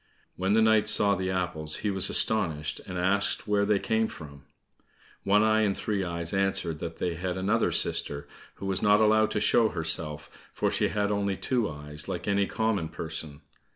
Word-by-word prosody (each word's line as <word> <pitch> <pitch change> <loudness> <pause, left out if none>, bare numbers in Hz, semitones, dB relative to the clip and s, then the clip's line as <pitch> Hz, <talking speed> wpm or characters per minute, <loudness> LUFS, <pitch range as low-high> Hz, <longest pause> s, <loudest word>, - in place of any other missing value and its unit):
When 95 +2 0
the 110 0 +4
knight 110 -1 +3
saw 105 -1 +4
the 95 -1 -2
apples 85 -4 -2
he 105 - +2
was 95 -1 0
astonished, 80 -8 +1
and 90 -1 -5
asked 95 +5 +1
where 100 -1 +2
they 105 0 +2
came 110 +2 0
from. 70 -6 -11 0.8
One 105 +2 +4
eye 110 0 +3
and 100 -2 0
Three 100 -3 -2
eyes 85 -2 -4
answered 95 -5 0
that 85 0 -6
they 90 - -2
had 90 +2 -4
another 105 +5 +1
sister, 70 0 0 0.3
who - - -8
was 95 -1 -1
not 105 0 +4
allowed 110 0 +4
to 105 - -1
show 110 +1 +3
herself, 80 -3 -2 0.2
for - - 0
she - - +1
had 105 -1 -1
only 100 -1 0
two 120 +1 -1
eyes 75 0 -5
like 90 - -5
any 100 -1 +1
common 110 -7 -1
person. 75 -1 -5
95 Hz, 190 wpm, -27 LUFS, 85-105 Hz, 0.8 s, the